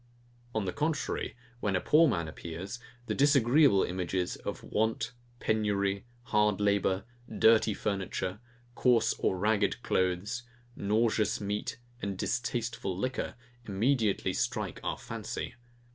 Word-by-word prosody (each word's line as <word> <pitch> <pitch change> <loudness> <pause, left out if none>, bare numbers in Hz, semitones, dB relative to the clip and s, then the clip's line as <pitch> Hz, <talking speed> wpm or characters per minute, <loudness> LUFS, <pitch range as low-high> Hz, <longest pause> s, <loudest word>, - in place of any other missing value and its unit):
On 110 -3 0
the 90 - -2
contrary, 155 +2 -1 0.2
when 100 -4 0
a - - +3
poor 160 - +5
man 85 - 0
appears, 85 +8 -6 0.3
the - - -1
disagreeable 140 -4 +5
images 90 0 -1
of - - -6
want, 110 +1 0 0.3
penury, 100 -2 0 0.2
hard 105 -3 +2
labour, 100 -2 +2 0.3
dirty 110 -2 +5
furniture, 95 -1 -2 0.3
coarse 120 -2 +3
or 95 - +1
ragged 105 +3 +1
clothes, 95 +6 0 0.3
nauseous 110 +1 +1
meat 105 +2 -3 0.2
and 100 -2 -3
distasteful 120 -4 -2
liquor, 130 +6 -2 0.3
immediately 110 +1 +1
strike - - -1
our - - -1
fancy. - - -5
105 Hz, 115 wpm, -30 LUFS, 95-120 Hz, 0.3 s, poor